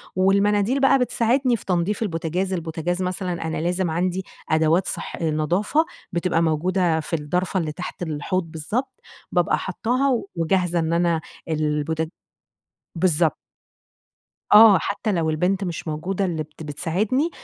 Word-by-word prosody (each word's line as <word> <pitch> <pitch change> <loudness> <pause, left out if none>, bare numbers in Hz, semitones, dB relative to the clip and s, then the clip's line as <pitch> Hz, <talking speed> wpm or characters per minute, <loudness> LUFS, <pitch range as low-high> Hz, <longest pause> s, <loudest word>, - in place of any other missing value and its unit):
والمناديل 200 +6 +3
بقى 270 0 +5
بتساعدني 250 +1 +2
في - - -14
تنضيف 185 +3 0
البوتجاز، 180 0 -2
البوتجاز 170 +1 -2
مثلًا 180 -2 -3
أنا 160 - -2
لازم 175 +1 0
عندي 180 +3 -1 0.2
أدوات 160 +3 +3
صح - - -5
نضافة 170 - +1 0.3
بتبقى 170 -1 +1
موجودة 170 +1 +1
في 160 - -7
الدرفة 180 +5 -1
اللي 160 -3 -2
تحت 180 +4 -7
الحوض 160 +3 -1
بالضبط، 240 - -4 0.3
بابقى 175 -2 +2
حاطاها 245 +6 0
وجاهزة 175 +1 +1
إن 165 0 0
أنا 170 -1 +2 0.3
البوت 155 0 -1 0.9
بالضبط. 165 -3 +2 1.2
آه، 210 -2 +9
حتى 205 +4 -2
لو 165 -4 0
البنت 180 +5 0
مش 175 -2 -5
موجودة 180 +6 -2
اللي 165 -4 -2
بت 155 +1 -13
بتساعدني، 185 - 0
175 Hz, 130 wpm, -23 LUFS, 160-195 Hz, 1.2 s, آه